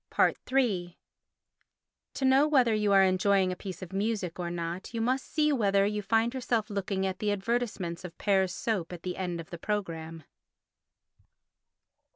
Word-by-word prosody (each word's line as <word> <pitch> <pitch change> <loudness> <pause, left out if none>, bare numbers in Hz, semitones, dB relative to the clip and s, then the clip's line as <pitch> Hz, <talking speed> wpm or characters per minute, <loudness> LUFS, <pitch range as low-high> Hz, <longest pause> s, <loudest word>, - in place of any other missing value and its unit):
iii 205 -10 +1 1.2
To 270 - -1
know 265 +3 +5
whether 255 -7 +4
you 210 -1 +1
are 195 -1 +7
enjoying 190 0 +3
a - - -3
piece 185 -2 -7
of 185 +1 -10
music 195 -4 -2
or 175 -1 -2
not 170 +5 -5
you - - -1
must 255 +3 -1
see 300 -1 +2
whether 200 -5 +3
you 210 +1 -1
find 225 +4 +1
yourself 235 -4 -1
looking 195 -1 -1
at 190 -1 -3
the 210 -1 0
advertisements 205 -4 -2
of 180 -2 -9
Pear's 190 -3 +2
soap 190 -4 -2
at 170 - -9
the 180 -1 -3
end 175 -2 -3
of 165 - -9
the 170 - -7
programme. 165 -6 -4
195 Hz, 165 wpm, -29 LUFS, 180-225 Hz, 1.2 s, are